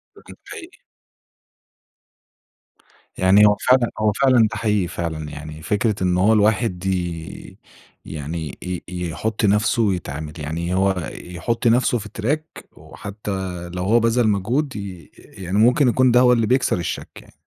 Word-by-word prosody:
فعلًا، -, -, -17 dB
ده -, -, -11 dB, 0.2 s
حقيقي. 360 Hz, -4 st, -10 dB, 2.4 s
يعني 100 Hz, +3 st, +5 dB
هو 105 Hz, 0 st, +5 dB
فعلًا 125 Hz, -2 st, +5 dB
هو 105 Hz, 0 st, +2 dB
فعلًا 125 Hz, -5 st, +5 dB
ده -, -, -4 dB
حقيقي 105 Hz, -5 st, 0 dB
فعلًا، 80 Hz, -3 st, -4 dB
يعني 75 Hz, +1 st, -9 dB
فكرة 105 Hz, +3 st, 0 dB
إن 90 Hz, 0 st, +1 dB
هو 105 Hz, +4 st, +4 dB
الواحد 105 Hz, -3 st, +1 dB
ي 85 Hz, -3 st, -4 dB, 0.5 s
يعني 75 Hz, -1 st, -6 dB
أ -, -, -7 dB
أ -, -, -7 dB
يحُط 90 Hz, +5 st, -2 dB
نفسه 110 Hz, +4 st, +2 dB
ويتعامل، 80 Hz, -6 st, -3 dB
يعني 85 Hz, +4 st, -3 dB
هو 95 Hz, 0 st, +2 dB, 0.2 s
يحُط 90 Hz, +8 st, -3 dB
نفسه 120 Hz, +1 st, +3 dB
في 105 Hz, -1 st, -8 dB
track 155 Hz, +7 st, -3 dB
وحتّى 105 Hz, +1 st, -9 dB, 0.4 s
لو 90 Hz, 0 st, -3 dB
هو 115 Hz, +5 st, +3 dB
بَذَل 115 Hz, 0 st, +2 dB
مجهود 120 Hz, +8 st, 0 dB
ي 95 Hz, -4 st, -8 dB
يعني 95 Hz, +1 st, -6 dB
ممكن 125 Hz, +5 st, +4 dB
يكون 130 Hz, +1 st, +3 dB
ده 125 Hz, -, +5 dB
هو 125 Hz, -1 st, +5 dB
اللي 115 Hz, -2 st, +1 dB
بيكسر 130 Hz, -4 st, +2 dB
الشَك 85 Hz, -, -4 dB
يعني، -, -, -20 dB
105 Hz, 150 wpm, -21 LUFS, 90-115 Hz, 2.4 s, يعني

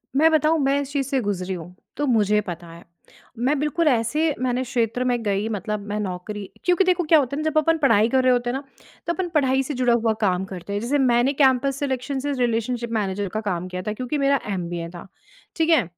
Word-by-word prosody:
मैं 320 Hz, +3 st, +5 dB
बताऊँ 315 Hz, 0 st, +3 dB
मैं 275 Hz, +1 st, +2 dB
इस 280 Hz, -, -6 dB
चीज़ 275 Hz, -2 st, 0 dB
से 270 Hz, -, +1 dB
गुज़री 190 Hz, -3 st, -2 dB
हूँ, 175 Hz, +1 st, -8 dB, 0.2 s
तो 290 Hz, -, 0 dB
मुझे 210 Hz, -3 st, +3 dB
पता 170 Hz, -1 st, -6 dB
है। 165 Hz, +1 st, -12 dB, 0.6 s
मैं 295 Hz, +2 st, +2 dB
बिल्कुल 305 Hz, +2 st, 0 dB
ऐसे 285 Hz, +5 st, +2 dB
मैंने 255 Hz, 0 st, 0 dB
क्षेत्र 240 Hz, -1 st, -1 dB
में 245 Hz, -2 st, +1 dB
गई 200 Hz, +1 st, 0 dB
मतलब 210 Hz, 0 st, -3 dB
मैं 210 Hz, +1 st, -2 dB
नौकरी 200 Hz, +1 st, -5 dB, 0.2 s
क्योंकि 360 Hz, +2 st, +4 dB
देखो 360 Hz, -1 st, +2 dB
क्या 315 Hz, 0 st, +5 dB
होता 280 Hz, 0 st, -1 dB
है -, -, -2 dB
ना 315 Hz, -, +1 dB
जब 310 Hz, -, -2 dB
अपन 325 Hz, +1 st, +3 dB
पढ़ाई 230 Hz, -6 st, +4 dB
कर 260 Hz, 0 st, +2 dB
रहे 255 Hz, -, +4 dB
होते 240 Hz, 0 st, 0 dB
हैं 250 Hz, -, -2 dB
ना, 280 Hz, -, -7 dB, 0.4 s
तो 340 Hz, -, +1 dB
अपन 365 Hz, -1 st, -3 dB
पढ़ाई 265 Hz, -2 st, +3 dB
से 290 Hz, -, -4 dB
जुड़ा 250 Hz, -2 st, +2 dB
हुआ 225 Hz, -1 st, +2 dB
काम 190 Hz, -2 st, +1 dB
करते 185 Hz, +2 st, -6 dB
हैं। 205 Hz, -, 0 dB
जैसे 265 Hz, +5 st, 0 dB
मैंने 250 Hz, +1 st, +3 dB
कैंपस 265 Hz, 0 st, +3 dB
सिलेक्शन 270 Hz, 0 st, -2 dB
से 285 Hz, +2 st, -2 dB
रिलेशनशिप 235 Hz, 0 st, -1 dB
मैनेजर 200 Hz, -2 st, -1 dB
का 215 Hz, -, -3 dB
काम 185 Hz, -4 st, -3 dB
किया 180 Hz, 0 st, -5 dB
था 210 Hz, -, 0 dB
क्योंकि 255 Hz, +6 st, -3 dB
मेरा 280 Hz, 0 st, +2 dB
एमबीए 170 Hz, -2 st, -4 dB
था। 175 Hz, +1 st, -10 dB, 0.5 s
ठीक 325 Hz, 0 st, +1 dB
है? 325 Hz, -, +5 dB
245 Hz, 235 wpm, -23 LUFS, 205-280 Hz, 0.6 s, मैं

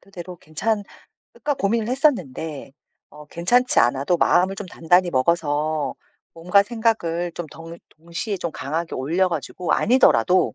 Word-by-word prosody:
토대로 180 Hz, -2 st, -10 dB
'괜찮을까.' 210 Hz, -, -4 dB
고민을 220 Hz, +2 st, 0 dB
했었는데 165 Hz, -, -1 dB, 0.4 s
어 150 Hz, 0 st, -13 dB
괜찮지 240 Hz, +12 st, +1 dB
않아도 135 Hz, +8 st, +2 dB
마음을 180 Hz, +3 st, +3 dB
좀 205 Hz, -, -6 dB
단단히 175 Hz, +2 st, +2 dB
먹어서 155 Hz, +1 st, 0 dB, 0.4 s
몸과 180 Hz, +4 st, +3 dB
생각을 200 Hz, -7 st, -1 dB
좀 175 Hz, -, -5 dB
덩 165 Hz, +1 st, -10 dB
동시에 170 Hz, +6 st, -5 dB
좀 170 Hz, -3 st, -4 dB
강하게 165 Hz, +4 st, -4 dB
올려 170 Hz, +8 st, +1 dB
가지고 180 Hz, +1 st, -3 dB
아니더라도 185 Hz, -, +3 dB
175 Hz, 315 characters per minute, -22 LUFS, 160-200 Hz, 0.4 s, 마음을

